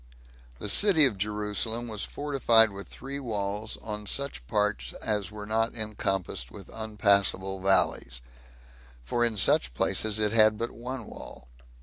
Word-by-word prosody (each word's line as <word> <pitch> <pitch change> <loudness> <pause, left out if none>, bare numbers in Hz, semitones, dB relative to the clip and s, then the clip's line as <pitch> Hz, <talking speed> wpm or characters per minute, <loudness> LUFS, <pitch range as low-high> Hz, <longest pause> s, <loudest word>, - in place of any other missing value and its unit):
The 105 - -5
city 160 - +7
of 110 -8 -1
Jerusalem 105 +3 -2
was 110 -3 -2
fortified 120 -6 +2
with 100 0 -9
three 135 +3 -7
walls, 105 -3 -4
on 105 -1 -6
such 120 - -2
parts 65 - -1
as 105 -2 -2
were 105 0 -9
not 115 +2 -1
encompassed 95 - -3
with 100 -3 -13
unpassable 100 -3 0
valleys; 95 -10 +1 0.8
for 120 - -1
in 115 -2 -1
such 65 -9 +3
places 110 - +2
it 105 -1 +1
had 110 -1 +4
but 115 +1 -4
one 125 0 -7
wall. - - -12
105 Hz, 140 wpm, -27 LUFS, 100-115 Hz, 0.8 s, city